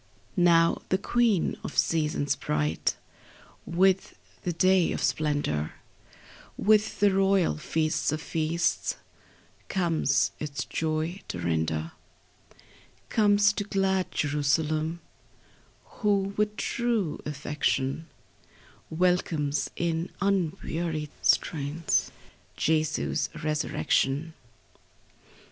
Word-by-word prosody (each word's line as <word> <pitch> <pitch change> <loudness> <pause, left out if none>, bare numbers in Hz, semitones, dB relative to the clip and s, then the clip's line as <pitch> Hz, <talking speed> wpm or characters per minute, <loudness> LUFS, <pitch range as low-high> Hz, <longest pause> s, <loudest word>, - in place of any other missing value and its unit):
35 175 - +1
Now 165 -1 +4
the 190 - +3
queen 220 -2 +1
of - - -6
seasons, 150 -3 +1
bright 75 - -1 0.7
With 190 +2 +2 0.3
the 175 - -1
day 185 +1 +3
of - - -3
splendor, 145 - 0 0.8
With 215 0 +3
the 205 -1 +5
royal 195 -3 +2
feast 155 -1 0
of 155 - -2
feasts, 165 +2 -1 0.7
Comes 165 -7 +1
its 145 -2 -4
joy 160 +3 -2
to - - -5
render; 80 -1 -1 1.2
Comes 205 -1 +4
to 205 - -2
glad 195 -2 0
Jerusalem, 155 +3 0 0.8
Who 200 -2 0
with 210 0 0
true 230 -9 -1
affection 150 0 -1 0.8
Welcomes, 160 -4 +1
in 170 0 -1
unwearied 170 -5 -1
strains, 150 +1 +1 0.5
Jesu's 155 -1 0
resurrection. 150 0 0
165 Hz, 85 wpm, -27 LUFS, 150-190 Hz, 1.2 s, the